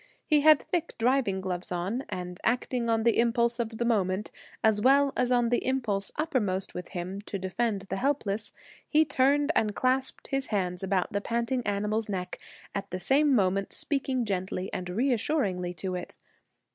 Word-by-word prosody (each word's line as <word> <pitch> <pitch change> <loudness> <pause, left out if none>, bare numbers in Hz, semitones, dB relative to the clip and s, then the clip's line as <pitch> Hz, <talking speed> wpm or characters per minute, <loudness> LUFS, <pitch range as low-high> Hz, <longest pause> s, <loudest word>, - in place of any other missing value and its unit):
He 300 -2 +4
had 305 -1 +6
thick 340 -2 -2
driving 235 -5 +1
gloves 180 -1 -4
on, 190 +9 -2
and 180 -1 -5
acting 245 0 0
on 225 -1 +2
the 235 0 +3
impulse 235 0 +2
of 225 -1 -3
the 235 - -1
moment, 200 -3 0 0.3
as 220 -1 +3
well 275 +3 +4
as 250 0 +1
on 240 -1 +3
the 240 - +1
impulse 225 -7 0
uppermost 215 - -1
with 180 0 -6
him 185 +2 -5
to 200 - -3
defend 200 +2 -1
the 195 - -4
defenceless, 225 -5 -1 0.4
he 315 +1 +4
turned 285 +2 +3
and 210 -2 +1
clasped 260 +1 0
his 270 -1 0
hands 180 -4 -1
about 190 -1 0
the 200 - 0
panting 235 +3 -1
animal's 210 +2 -1
neck, 180 -2 -4 0.3
at 200 0 -4
the 185 - -4
same 275 +8 +3
moment 195 -2 +1
speaking 265 -4 -1
gently 185 -1 -3
and 180 -1 -4
reassuringly 215 - 0
to 185 +3 -4
it. 180 -1 -6
220 Hz, 170 wpm, -28 LUFS, 190-260 Hz, 0.4 s, had